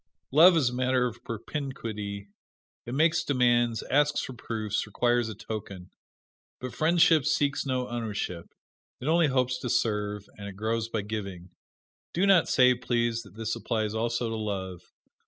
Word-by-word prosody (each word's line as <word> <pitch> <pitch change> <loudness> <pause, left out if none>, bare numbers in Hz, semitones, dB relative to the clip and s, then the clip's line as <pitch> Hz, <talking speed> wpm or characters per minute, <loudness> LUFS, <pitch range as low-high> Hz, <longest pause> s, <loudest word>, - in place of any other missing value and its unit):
Love 165 +5 +7
is 130 -6 +2
a - - -8
matter 130 0 +1
of 120 0 -5
propinquity; 110 -5 -5 0.6
it 120 - -4
makes 165 +3 +3
demands, 120 -5 +2
asks 145 +2 +3
for 130 - -6
proofs, 110 -3 -3
requires 120 +2 +1
a 110 - -6
token. 100 -3 -7 0.7
But 130 0 -6
friendship 165 -1 +4
seeks 145 +2 0
no 130 -1 -1
ownership 105 -7 -4 0.5
it 130 - -6
only 165 0 +4
hopes 125 -2 0
to 125 - -4
serve, 105 -3 -1
and 100 - -7
it 100 - -8
grows 110 +2 -2
by 110 -3 -2
giving. 100 -4 -6 0.6
Do 180 +4 +2
not 190 -5 +5
say, 125 -1 +5
please, 120 -2 -1
that 100 -4 -16
this 115 0 -3
applies 110 -3 -2
also 120 +1 -1
to 115 - -3
love. 95 -4 -4
120 Hz, 155 wpm, -28 LUFS, 105-130 Hz, 0.7 s, Love